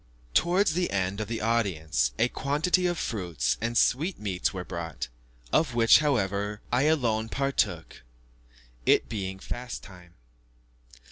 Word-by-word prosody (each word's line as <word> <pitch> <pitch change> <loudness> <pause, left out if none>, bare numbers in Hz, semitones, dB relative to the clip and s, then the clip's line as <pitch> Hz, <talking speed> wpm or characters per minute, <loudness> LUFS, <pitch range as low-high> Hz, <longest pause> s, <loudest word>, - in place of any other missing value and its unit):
Towards 175 - +3
the 180 +1 0
end 95 +1 -1
of 105 - -3
the 115 +1 -3
audience, 80 - +1
a - - +3
quantity 155 +8 +1
of 175 -1 -1
fruits 90 - -1
and 115 +1 -1
sweetmeats 115 - +1
were 90 -2 -6
brought, 85 -5 -5 0.4
of 140 -7 +2
which, 115 -1 +7
however, 105 -7 0
I 125 +4 +3
alone 115 -8 +1
partook 135 +2 -1 0.9
it - - +4
being 95 -4 -4
fast 120 +5 -6
time. 90 -3 -14
115 Hz, 130 wpm, -27 LUFS, 95-140 Hz, 0.9 s, which